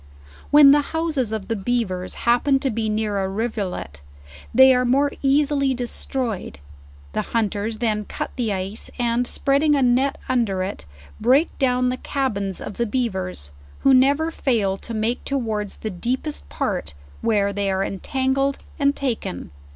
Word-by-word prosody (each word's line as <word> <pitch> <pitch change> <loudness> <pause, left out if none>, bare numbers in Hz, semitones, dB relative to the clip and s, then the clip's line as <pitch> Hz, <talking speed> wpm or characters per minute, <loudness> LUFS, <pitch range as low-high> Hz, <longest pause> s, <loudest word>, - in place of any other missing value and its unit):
When 290 -1 +8
the 290 +1 +5
houses 310 -6 -1
of 215 -3 -4
the 225 - -1
beavers 195 -4 -2
happen 245 +4 +4
to 270 - 0
be 220 0 -1
near 210 -1 -1
a 190 0 -1
riv 220 +4 -2
ulet, 180 - -5 0.5
they 265 0 +7
are 250 0 +2
more 275 +3 +2
easily 275 -1 +2
destroyed: 245 - -3 0.6
the - - 0
hunters 215 -1 -1
then 215 -2 -1
cut - - -5
the 235 -4 -1
ice, 195 +2 -4
and 240 0 0
spreading 285 +3 +2
a 275 - +2
net 255 +3 +2
under 225 -8 +1
it, 185 - -6 0.3
break 265 +8 +3
down 250 -1 +2
the 255 - -2
cabins 205 -10 -2
of 205 - -7
the 235 - 0
beavers, 190 - -3 0.3
who 270 - +5
never 280 +5 +4
fail 220 -11 0
to 230 - -8
make 225 +3 -1
towards 220 -7 -2
the 220 - -4
deepest 175 - -3
part, 70 - -3 0.3
where 205 -3 +1
they 200 0 -1
are 190 0 0
entangled 265 +7 -1 0.2
and 280 0 +3
taken. 225 - -3
235 Hz, 160 wpm, -22 LUFS, 205-270 Hz, 0.6 s, When